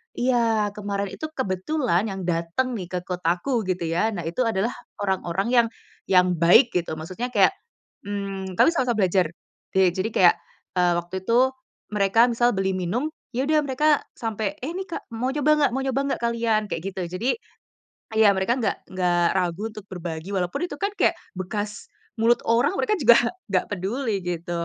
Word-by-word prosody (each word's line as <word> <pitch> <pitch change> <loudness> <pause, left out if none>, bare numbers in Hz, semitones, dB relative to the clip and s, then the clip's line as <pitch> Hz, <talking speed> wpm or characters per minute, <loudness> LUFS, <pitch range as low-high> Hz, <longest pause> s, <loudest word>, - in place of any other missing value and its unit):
iya, 230 -4 +2
kemarin 200 -1 -2
itu 315 - -6
kebetulan 215 - 0
yang 195 -1 -5
datang 175 +9 -1
nih, 185 - -5
ke 180 0 -3
kotaku 180 +6 -1
gitu 185 -1 -1
ya, 215 +7 +1
nah 175 - -3
itu 170 +10 -1
adalah 225 0 +1 0.3
orang-orang 190 -1 -1
yang 235 -2 +5 0.4
yang 180 -1 +5
baik 175 - +6
gitu, 175 -3 -1
maksudnya 185 +11 -5
kayak, - - +6 0.6
mmm, 195 -2 -4
kami - - +5
sama-sama 240 -8 +1
belajar, 185 -1 +3 0.5
de 190 -1 +5
jadi 190 +5 -2
kayak, 175 -2 +6 0.4
eee, 180 -1 +4
waktu 180 +2 -5
itu, 245 +4 +4 0.4
mereka 210 +4 +4
misal 240 +1 +2
beli 190 -1 0
minum, 220 - -1 0.2
ya 255 +3 0
udah 310 -1 +4
mereka 295 +3 +2
sampai, 220 -3 -3
"Eh 265 - -3
ini, 380 +1 -4
Kak, 340 - -7
mau 255 +3 0
coba 295 0 +1
nggak 285 -4 +3
Mau 270 - 0
coba 265 0 0
nggak - - -5
kalian?" 230 -2 +1
Kayak 165 - -3
gitu. 190 - -4 0.2
Jadi, 240 +7 -1 0.9
ya 220 -2 +6
mereka 190 +5 +1
nggak 225 - -2
nggak 175 -2 +2
ragu 180 0 -1
untuk 215 -3 -10
berbagi, 175 -1 -6
walaupun 185 - -1
itu 290 - -7
kan 400 - 0
kayak - - +4 0.2
bekas 205 +2 -4 0.3
mulut 235 +1 +4
orang, 240 +8 +3
mereka 425 -3 +1
juga 240 -7 +7 0.3
nggak 185 -2 +1
peduli 205 +2 -2
gitu, 175 -1 -4
205 Hz, 175 wpm, -24 LUFS, 180-240 Hz, 0.9 s, juga